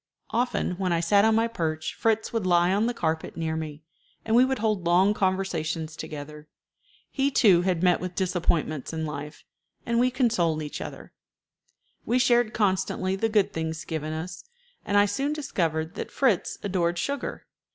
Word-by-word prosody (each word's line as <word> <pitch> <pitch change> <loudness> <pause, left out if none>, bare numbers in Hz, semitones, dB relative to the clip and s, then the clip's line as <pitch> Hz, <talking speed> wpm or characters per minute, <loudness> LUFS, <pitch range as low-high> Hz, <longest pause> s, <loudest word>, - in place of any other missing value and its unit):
"] - - -49
Often 235 -6 0
when 185 -2 0
I 170 - +2
sat 200 +5 +4
on 220 0 +4
my 225 +1 +3
perch 160 -7 -3
Fritz 220 0 0
would 220 -5 -1
lie 175 +1 +4
on 210 +3 +2
the 245 - -1
carpet 160 -3 -2
near 160 -1 -2
me, 155 -1 -6 0.4
and 225 - +1
we 245 - +7
would 265 0 +1
hold 215 -4 0
long 180 +4 +4
conversations 170 -5 -1
together. 150 -1 -8 0.6
He, 275 0 +1
too, 200 -10 +5
had 180 -2 0
met 180 -1 +4
with 180 0 -5
disappointments 170 -6 -1
in 160 0 -2
life, 150 0 -7 0.4
and 235 0 +1
we 250 +1 +4
consoled 220 - +1
each 150 - -6
other. - - -8 0.9
We 245 - +1
shared 240 -3 +3
constantly 190 -2 0
the 225 +3 0
good 210 -3 +2
things 160 0 -4
given 155 -1 -4
us, 160 +3 -6 0.4
and 205 - +1
I 205 - +6
soon 270 +9 -1
discovered 165 - -2
that - - -5
Fritz 245 -10 +1
adored 175 -3 0
sugar. 280 +10 -3
185 Hz, 175 wpm, -26 LUFS, 160-220 Hz, 0.9 s, we